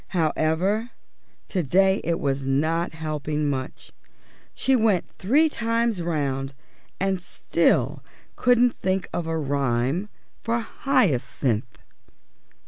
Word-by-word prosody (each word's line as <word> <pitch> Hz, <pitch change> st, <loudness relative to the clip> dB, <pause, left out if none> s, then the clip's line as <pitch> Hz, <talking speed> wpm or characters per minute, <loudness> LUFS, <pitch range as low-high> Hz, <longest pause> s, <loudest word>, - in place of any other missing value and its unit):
However, 170 Hz, +8 st, +1 dB, 0.6 s
to 185 Hz, -, 0 dB
day 190 Hz, +6 st, +3 dB
it 170 Hz, 0 st, 0 dB
was 140 Hz, -1 st, -1 dB
not 160 Hz, +6 st, 0 dB
helping 150 Hz, -1 st, -2 dB
much; 130 Hz, -2 st, -4 dB, 0.6 s
she 265 Hz, -, +2 dB
went 220 Hz, -7 st, +2 dB
three 280 Hz, +12 st, +4 dB
times 230 Hz, -, 0 dB
round 140 Hz, -5 st, -2 dB, 0.4 s
and 190 Hz, -1 st, 0 dB
still -, -, +1 dB, 0.3 s
couldn't 245 Hz, -1 st, +4 dB
think 190 Hz, 0 st, 0 dB
of 170 Hz, -2 st, -2 dB
a 165 Hz, 0 st, -1 dB
rhyme 140 Hz, -, 0 dB, 0.3 s
for 230 Hz, 0 st, 0 dB
Hyacinth. 135 Hz, -, 0 dB
170 Hz, 105 wpm, -24 LUFS, 140-210 Hz, 0.6 s, three